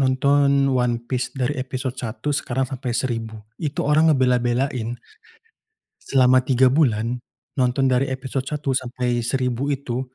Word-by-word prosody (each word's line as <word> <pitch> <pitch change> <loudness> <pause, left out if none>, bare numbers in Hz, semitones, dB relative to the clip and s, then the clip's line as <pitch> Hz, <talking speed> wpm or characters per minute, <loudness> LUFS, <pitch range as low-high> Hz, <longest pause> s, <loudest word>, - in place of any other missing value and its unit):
nonton 140 +1 +3
One 125 -1 +1
Piece 130 -1 -2
dari 130 +3 0
episode 130 0 -4
1 130 +5 -3
sekarang 130 -1 -1
sampai 130 -1 -5
1000, 115 -3 -3 0.3
itu 150 -1 -3
orang 155 +2 +4
ngebela-belain 125 -2 +1 1.0
selama 130 -1 +4
3 130 0 +3
bulan 120 -4 +1 0.3
nonton 130 0 +1
dari 130 +1 +2
episode 130 0 -4
1 145 -3 -2
sampai 125 -1 -1
1000 125 +2 -1
itu 130 -3 -2
130 Hz, 130 wpm, -22 LUFS, 125-140 Hz, 1.0 s, orang